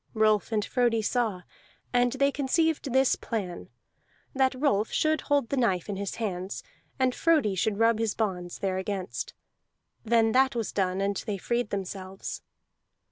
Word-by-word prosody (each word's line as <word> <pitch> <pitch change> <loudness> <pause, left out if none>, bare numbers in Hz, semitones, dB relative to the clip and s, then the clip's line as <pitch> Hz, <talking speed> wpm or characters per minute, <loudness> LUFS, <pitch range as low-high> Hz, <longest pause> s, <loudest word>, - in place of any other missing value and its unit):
Rolf 215 0 +3
and 210 -2 +1
Frodi 235 -3 +1
saw; 215 -6 0 0.5
and 245 0 +3
they 275 +1 +2
conceived 290 +1 0
this 265 +1 +4
plan, 195 -7 -4 0.6
that 265 -1 +2
Rolf 225 -7 +2
should 310 0 +1
hold 285 -5 +1
the 280 - -1
knife 195 -7 +1
in 200 - -2
his 200 0 -4
hands, 190 -4 -4 0.3
and 260 -1 +2
Frodi 305 -12 +3
should 200 +2 0
rub 225 0 +3
his 225 -2 0
bonds 180 -5 -2
thereagainst. 190 0 -3 0.7
Then 225 -1 +3
that 265 +1 +3
was 230 -3 -2
done, 190 -1 0
and 200 0 0
they 205 -2 -1
freed 235 +4 -1
themselves. 190 -1 -5
220 Hz, 150 wpm, -28 LUFS, 195-255 Hz, 0.7 s, this